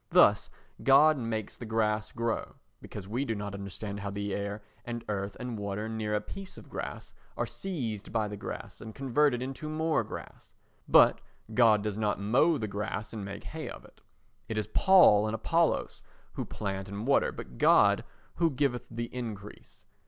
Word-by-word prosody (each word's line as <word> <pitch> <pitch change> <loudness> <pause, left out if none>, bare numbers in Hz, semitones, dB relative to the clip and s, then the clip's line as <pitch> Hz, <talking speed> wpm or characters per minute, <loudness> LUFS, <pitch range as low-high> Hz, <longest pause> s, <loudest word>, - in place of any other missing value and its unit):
Thus - - +5 0.3
God 145 +2 +6
makes 110 -3 -3
the 120 - -8
grass 110 -1 0
grow 115 -1 -2 0.3
because 95 -2 -8
we 120 +6 -1
do 115 -5 -2
not 100 -1 -5
understand 100 +1 -5
how 100 0 -4
the 100 0 -3
air 100 +1 -3 0.2
and 120 -1 -5
earth 100 -1 -3
and 125 -3 -4
water 100 +1 -3
near 110 -1 -2
a 105 - 0
piece 195 - -9
of - - -12
grass - - -6 0.2
are - - 0
seized 120 - -4
by 110 -2 +1
the 105 - -5
grass 100 - -7
and 110 -1 -9
converted 135 -1 +2
into 135 +4 -5
more 160 0 +1
grass; - - -10 0.3
but - - +6 0.3
God 110 -3 +5
does 105 -1 -2
not 105 -2 0
mow 130 +11 +3
the 110 - -3
grass 105 0 -4
and 110 -3 -5
make 100 0 -7
hay - - -6
of - - -9
it. - - -20 0.5
It 110 - -2
is 105 - 0
Paul 175 - +6
and 110 - -1
Apollos 165 +9 +1 0.3
who - - -3
plant 95 -1 -4
and 100 +2 -5
water, 140 - +3
but - - -9
God - - +5 0.3
who 165 -1 +3
giveth 135 -4 -1
the 115 0 -3
increase. 110 -5 -8
110 Hz, 180 wpm, -30 LUFS, 105-125 Hz, 0.5 s, God